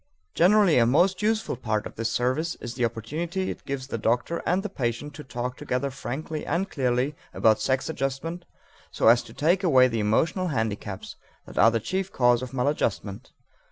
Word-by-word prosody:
Generally 185 Hz, -4 st, +5 dB
a 115 Hz, -, +4 dB
most 180 Hz, -, +3 dB
useful 215 Hz, -4 st, 0 dB
part 110 Hz, -3 st, -2 dB
of -, -, -7 dB
this 115 Hz, +1 st, -2 dB
service 130 Hz, +8 st, 0 dB
is 120 Hz, -, -7 dB
the 125 Hz, -, -2 dB
opportunity 155 Hz, -, -2 dB
it -, -, -9 dB
gives 135 Hz, -1 st, -3 dB
the 115 Hz, -4 st, -4 dB
doctor 120 Hz, +10 st, 0 dB
and 185 Hz, +3 st, +1 dB
the -, -, -2 dB
patient 140 Hz, -, -3 dB
to 150 Hz, -, -9 dB
talk 125 Hz, -1 st, -5 dB
together 130 Hz, +2 st, -2 dB
frankly 150 Hz, +4 st, -5 dB
and 190 Hz, +4 st, -1 dB
clearly 130 Hz, +1 st, 0 dB, 0.2 s
about 110 Hz, -1 st, +3 dB
sex 130 Hz, -1 st, 0 dB
adjustment 145 Hz, +6 st, -3 dB, 0.4 s
so -, -, 0 dB
as 120 Hz, +1 st, +6 dB
to -, -, -13 dB
take 175 Hz, +6 st, +1 dB
away 130 Hz, -8 st, +6 dB
the 115 Hz, -2 st, -2 dB
emotional 160 Hz, -, +1 dB
handicaps 110 Hz, -, -3 dB, 0.3 s
that -, -, -6 dB
are 115 Hz, -, +7 dB
the 115 Hz, 0 st, 0 dB
chief 190 Hz, -, -3 dB
cause 120 Hz, -1 st, +3 dB
of 130 Hz, -, -6 dB
maladjustment. 125 Hz, -7 st, -2 dB
130 Hz, 185 wpm, -26 LUFS, 120-165 Hz, 0.4 s, are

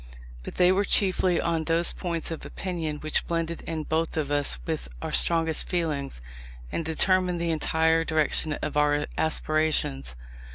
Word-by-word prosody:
But -, -, -9 dB
they 180 Hz, 0 st, +4 dB
were 195 Hz, +2 st, +2 dB
chiefly 185 Hz, -3 st, +3 dB
on 165 Hz, -1 st, -1 dB
those 165 Hz, +1 st, +3 dB
points 170 Hz, -3 st, -3 dB
of 165 Hz, -, -6 dB
opinion 165 Hz, -5 st, -4 dB
which 155 Hz, 0 st, 0 dB
blended 165 Hz, 0 st, -2 dB
in 160 Hz, -1 st, -3 dB
both 160 Hz, +1 st, -1 dB
of 145 Hz, -2 st, -2 dB
us 145 Hz, -, +1 dB
with -, -, -3 dB
our -, -, -5 dB
strongest 165 Hz, -2 st, +3 dB
feelings, 145 Hz, -, -2 dB, 0.5 s
and -, -, -2 dB
determined 180 Hz, +2 st, +1 dB
the 170 Hz, 0 st, -1 dB
entire 160 Hz, +1 st, +1 dB
direction 155 Hz, -1 st, +1 dB
of 150 Hz, -, -3 dB
our 145 Hz, 0 st, +2 dB
aspirations. 155 Hz, -, 0 dB
160 Hz, 155 wpm, -26 LUFS, 150-170 Hz, 0.5 s, they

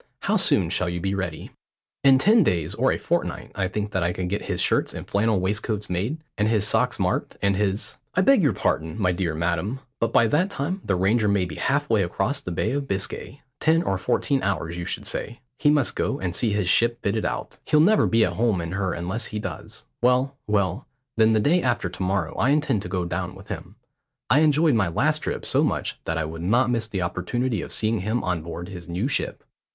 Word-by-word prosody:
How -, -, +1 dB
soon -, -, +3 dB
shall 90 Hz, -, +1 dB
you 85 Hz, 0 st, -3 dB
be 95 Hz, +3 st, -1 dB
ready?" 95 Hz, -5 st, -4 dB, 0.5 s
"In 135 Hz, -1 st, +7 dB
ten 215 Hz, -, +5 dB
days 85 Hz, -, +1 dB
or -, -, +2 dB
a -, -, 0 dB
fortnight -, -, -2 dB
I 95 Hz, -, -1 dB
think 105 Hz, +2 st, -3 dB
that 95 Hz, -, -1 dB
I 85 Hz, +1 st, 0 dB
could 90 Hz, 0 st, -3 dB
get 100 Hz, -, -3 dB
his -, -, -2 dB
shirts -, -, +1 dB
and -, -, -7 dB
flannel 105 Hz, 0 st, +1 dB
waistcoats 105 Hz, +2 st, -2 dB
made, 100 Hz, -, -1 dB, 0.2 s
and 105 Hz, -, +3 dB
his 110 Hz, -2 st, +2 dB
socks -, -, +2 dB
marked, -, -, -1 dB
and 100 Hz, 0 st, +1 dB
his 100 Hz, +1 st, -2 dB
" -, -, -37 dB
"I 185 Hz, -, +4 dB
beg 265 Hz, +3 st, +5 dB
your 145 Hz, -9 st, +3 dB
pardon, 80 Hz, +2 st, -1 dB
my 90 Hz, -3 st, +2 dB
dear 85 Hz, -3 st, -2 dB
madam, 85 Hz, +9 st, -1 dB, 0.2 s
but 115 Hz, -1 st, 0 dB
by 115 Hz, -, +5 dB
that 155 Hz, -, +2 dB
time 185 Hz, +3 st, -3 dB
the 100 Hz, -, 0 dB
Ranger 105 Hz, +4 st, +2 dB
may 100 Hz, -2 st, +2 dB
be 85 Hz, -, -7 dB
halfway 140 Hz, -, +1 dB
across 95 Hz, +10 st, -1 dB
the 90 Hz, -, -5 dB
Bay 85 Hz, -, -1 dB
of 140 Hz, 0 st, -2 dB
Biscay. 100 Hz, +6 st, -3 dB, 0.2 s
Ten 165 Hz, +1 st, +3 dB
or 95 Hz, -, -1 dB
fourteen 135 Hz, +8 st, 0 dB
hours 85 Hz, -4 st, -2 dB
you 85 Hz, 0 st, -5 dB
should -, -, -2 dB
say. 120 Hz, -, -4 dB, 0.2 s
He 145 Hz, -, +4 dB
must 145 Hz, -4 st, +2 dB
go 135 Hz, -, -1 dB
and 90 Hz, -1 st, -3 dB
see 115 Hz, -, +1 dB
his 105 Hz, -3 st, 0 dB
ship 115 Hz, +6 st, +3 dB
fitted 105 Hz, +2 st, 0 dB
out. -, -, -4 dB
He'll 150 Hz, -, +3 dB
never 205 Hz, +8 st, +5 dB
be 115 Hz, -1 st, +4 dB
at -, -, -2 dB
home 110 Hz, -4 st, +1 dB
in 85 Hz, 0 st, -4 dB
her 95 Hz, -1 st, -1 dB
unless 90 Hz, +7 st, -3 dB
he 105 Hz, -, -5 dB
does. 95 Hz, -7 st, -7 dB, 0.2 s
Well, 125 Hz, +3 st, +2 dB
well, 100 Hz, -4 st, 0 dB, 0.3 s
then 110 Hz, 0 st, +4 dB
the 110 Hz, -, +3 dB
day 170 Hz, +11 st, +3 dB
after 120 Hz, -, 0 dB
to 90 Hz, -, -9 dB
morrow 95 Hz, -3 st, 0 dB
I 125 Hz, -, +2 dB
intend 145 Hz, -7 st, +2 dB
to -, -, -7 dB
go 90 Hz, -3 st, -1 dB
down 90 Hz, +1 st, -3 dB
with 95 Hz, +2 st, -14 dB
him. 90 Hz, +4 st, -7 dB, 0.6 s
I 135 Hz, -, +6 dB
enjoyed 155 Hz, 0 st, +4 dB
my 105 Hz, -5 st, +2 dB
last 145 Hz, -, +1 dB
trip -, -, -4 dB
so -, -, +2 dB
much -, -, -2 dB
that 80 Hz, -, -1 dB
I 80 Hz, -, -1 dB
would 80 Hz, +1 st, -7 dB
not 120 Hz, +8 st, +2 dB
miss 115 Hz, -2 st, -1 dB
the 95 Hz, -4 st, -2 dB
opportunity 110 Hz, +5 st, -2 dB
of -, -, -8 dB
seeing 110 Hz, 0 st, 0 dB
him 110 Hz, +6 st, -1 dB
on 90 Hz, -3 st, -1 dB
board 85 Hz, +2 st, -7 dB
his 90 Hz, -3 st, -9 dB
new 90 Hz, +8 st, -1 dB
ship. 140 Hz, -, -2 dB
105 Hz, 230 wpm, -24 LUFS, 90-125 Hz, 0.6 s, In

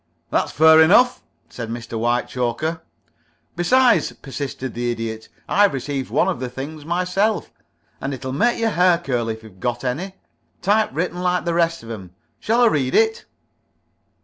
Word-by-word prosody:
"That's -, -, 0 dB
fair 160 Hz, +1 st, +6 dB
enough," 245 Hz, +10 st, +5 dB, 0.3 s
said 115 Hz, -2 st, -7 dB
Mr. 115 Hz, 0 st, -7 dB
Whitechoker. 120 Hz, +6 st, -1 dB, 0.7 s
"Besides," 245 Hz, +8 st, +3 dB
persisted 135 Hz, -2 st, -6 dB
the 120 Hz, 0 st, -2 dB
Idiot, 115 Hz, -1 st, -4 dB, 0.2 s
"I've 205 Hz, -6 st, +3 dB
received 135 Hz, 0 st, -4 dB
one -, -, +2 dB
of -, -, -1 dB
the 130 Hz, -1 st, -4 dB
things 145 Hz, +5 st, -7 dB
myself, 180 Hz, +5 st, 0 dB, 0.5 s
and 135 Hz, -, -3 dB
it'll 130 Hz, -1 st, -5 dB
make 235 Hz, -, +2 dB
your 225 Hz, -1 st, +1 dB
hair 180 Hz, -1 st, +4 dB
curl, 125 Hz, -8 st, -2 dB
if 110 Hz, 0 st, -5 dB
you've 100 Hz, -4 st, -15 dB
got 120 Hz, +3 st, -2 dB
any. 165 Hz, +10 st, -3 dB, 0.5 s
Typewritten 180 Hz, -4 st, 0 dB
like 180 Hz, 0 st, 0 dB
the 170 Hz, -, 0 dB
rest 165 Hz, -2 st, +1 dB
of 115 Hz, -, -8 dB
'em. 95 Hz, -5 st, -9 dB, 0.2 s
Shall 230 Hz, +3 st, +1 dB
I -, -, +6 dB
read 140 Hz, -, +1 dB
it?" 225 Hz, 0 st, +2 dB
150 Hz, 155 wpm, -21 LUFS, 120-180 Hz, 0.7 s, fair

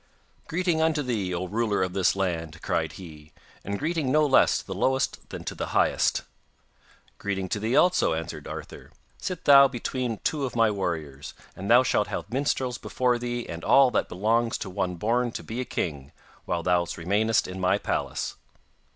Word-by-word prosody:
'Greeting 170 Hz, -1 st, 0 dB
unto 160 Hz, -2 st, +2 dB
thee, 110 Hz, -8 st, -2 dB
O 90 Hz, +1 st, -2 dB
ruler 105 Hz, 0 st, 0 dB
of 90 Hz, -1 st, -3 dB
this 95 Hz, -1 st, +2 dB
land,' 85 Hz, -5 st, -2 dB
cried 80 Hz, -1 st, -1 dB
he, 80 Hz, -4 st, -12 dB, 0.3 s
'and 100 Hz, +1 st, -3 dB
greeting 155 Hz, -2 st, -1 dB
no 155 Hz, +1 st, +4 dB
less 135 Hz, -, +4 dB
to -, -, -7 dB
the -, -, -5 dB
lowest 130 Hz, 0 st, -1 dB
than -, -, -7 dB
to -, -, -4 dB
the -, -, -4 dB
highest.' -, -, +2 dB, 1.0 s
'Greeting 95 Hz, -2 st, -2 dB
to 105 Hz, -, -1 dB
thee 110 Hz, +5 st, 0 dB
also,' 180 Hz, -, +4 dB
answered 80 Hz, 0 st, -6 dB
Arthur. -, -, -8 dB, 0.3 s
'Sit 180 Hz, -3 st, -5 dB
thou 140 Hz, -1 st, +9 dB
between 125 Hz, -2 st, -3 dB
two 150 Hz, -3 st, 0 dB
of 130 Hz, -, -3 dB
my 115 Hz, -2 st, +4 dB
warriors, 80 Hz, -8 st, -4 dB, 0.2 s
and 95 Hz, +2 st, -6 dB
thou 120 Hz, +2 st, +7 dB
shalt 105 Hz, -4 st, +1 dB
have 110 Hz, -, -5 dB
minstrels 130 Hz, -2 st, -1 dB
before 125 Hz, -1 st, 0 dB
thee 120 Hz, 0 st, -3 dB
and 85 Hz, 0 st, -7 dB
all 135 Hz, -2 st, +5 dB
that -, -, 0 dB
belongs 115 Hz, +5 st, +1 dB
to 95 Hz, -, -6 dB
one 90 Hz, -1 st, -2 dB
born 120 Hz, +6 st, 0 dB
to -, -, -6 dB
be 115 Hz, +3 st, -4 dB
a -, -, -4 dB
king, 70 Hz, -, -4 dB, 0.3 s
while 85 Hz, -1 st, -2 dB
thou 90 Hz, 0 st, +3 dB
remainest 105 Hz, +6 st, +1 dB
in 90 Hz, +1 st, -7 dB
my 95 Hz, +2 st, +2 dB
palace. -, -, -3 dB
110 Hz, 185 wpm, -26 LUFS, 90-130 Hz, 1.0 s, thou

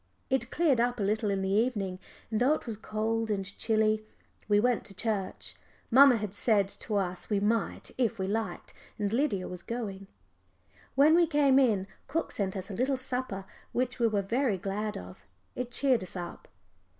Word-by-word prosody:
It 260 Hz, -2 st, +1 dB
cleared 290 Hz, -8 st, +3 dB
up 245 Hz, 0 st, 0 dB
a -, -, 0 dB
little 210 Hz, +1 st, +1 dB
in 195 Hz, -1 st, 0 dB
the 190 Hz, -, -1 dB
evening, 200 Hz, -4 st, 0 dB, 0.3 s
and 220 Hz, -, 0 dB
though 265 Hz, +5 st, +5 dB
it -, -, -8 dB
was 230 Hz, -3 st, -4 dB
cold 220 Hz, +1 st, -2 dB
and 195 Hz, -2 st, -1 dB
chilly 215 Hz, -1 st, +2 dB, 0.4 s
we 205 Hz, -1 st, +4 dB
went 245 Hz, +1 st, +2 dB
to 195 Hz, -, -11 dB
church. 205 Hz, -3 st, -3 dB, 0.4 s
Mamma 265 Hz, 0 st, +8 dB
had 210 Hz, -3 st, -4 dB
said 205 Hz, -2 st, +2 dB
to 210 Hz, -, -5 dB
us 185 Hz, -2 st, -1 dB
we 205 Hz, -2 st, +2 dB
might 220 Hz, +3 st, -1 dB
if 235 Hz, -2 st, +1 dB
we 190 Hz, -, -1 dB
liked, 205 Hz, -2 st, -3 dB, 0.2 s
and 205 Hz, 0 st, -1 dB
Lydia 230 Hz, -8 st, +1 dB
was 180 Hz, -1 st, -7 dB
going. 200 Hz, -3 st, -5 dB, 0.9 s
When 290 Hz, +4 st, +6 dB
we 340 Hz, 0 st, +5 dB
came 285 Hz, -3 st, +4 dB
in, 215 Hz, -8 st, +3 dB, 0.2 s
cook 330 Hz, +4 st, -2 dB
sent 195 Hz, -2 st, -2 dB
us 190 Hz, +2 st, -6 dB
a -, -, -4 dB
little 260 Hz, +6 st, +1 dB
supper 250 Hz, -6 st, -4 dB, 0.3 s
which 250 Hz, 0 st, -1 dB
we 235 Hz, -, +4 dB
were 205 Hz, -3 st, 0 dB
very 230 Hz, +1 st, +1 dB
glad 205 Hz, +3 st, -3 dB
of; 90 Hz, +1 st, -10 dB, 0.3 s
it 250 Hz, -1 st, -4 dB
cheered 255 Hz, -2 st, +2 dB
us 185 Hz, -, -6 dB
up. 175 Hz, -1 st, -7 dB
215 Hz, 185 wpm, -30 LUFS, 195-250 Hz, 0.9 s, Mamma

